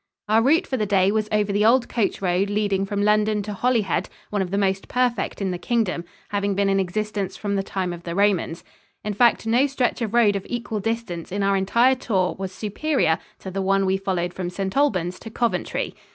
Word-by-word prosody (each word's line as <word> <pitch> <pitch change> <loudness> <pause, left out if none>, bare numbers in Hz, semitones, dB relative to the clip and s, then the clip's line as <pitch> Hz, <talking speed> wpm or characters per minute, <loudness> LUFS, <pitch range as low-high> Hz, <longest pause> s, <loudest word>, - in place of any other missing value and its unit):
Our 220 +2 +4
route 315 +9 +3
for 260 - -2
the 210 -3 -1
day 195 -1 +3
was 215 0 0
over 210 -1 +1
the 205 +1 +2
old 240 +3 +4
coach 220 -3 -1
road 185 +2 +1
leading 200 -2 0
from 205 0 -1
London 210 0 +2
to 210 +1 -5
Holyhead, 225 -3 0 0.2
one 205 -1 0
of 185 - -2
the 200 - -1
most 195 -1 0
perfect 240 -5 0
in 190 - 0
the 180 - -4
Kingdom, 200 -5 -1 0.2
having 200 -1 -1
been 200 0 +2
in 195 0 +2
existence 195 +1 -2
from 205 -1 -3
the 195 - +1
time 185 -2 -3
of 170 - -8
the 170 0 -5
Romans. 195 -4 +1 0.4
In 210 - -2
fact, 235 +2 +3
no 240 +5 +3
stretch 260 -2 -1
of 225 0 -2
road 215 -4 +5
of 195 - -2
equal 235 -3 -3
distance 225 -6 -3
in 200 +1 -1
our 195 0 +3
entire 235 +7 +3
tour 195 -8 0
was 190 -1 -4
superior 210 - 0 0.2
to 190 - -6
the 195 +1 -2
one 195 0 +2
we 190 0 +2
followed 185 -2 -2
from 180 -2 -4
St. 190 +1 -4
Albans 185 -11 +1
to 225 - -9
Coventry. 225 -5 -1
200 Hz, 220 wpm, -23 LUFS, 190-225 Hz, 0.4 s, road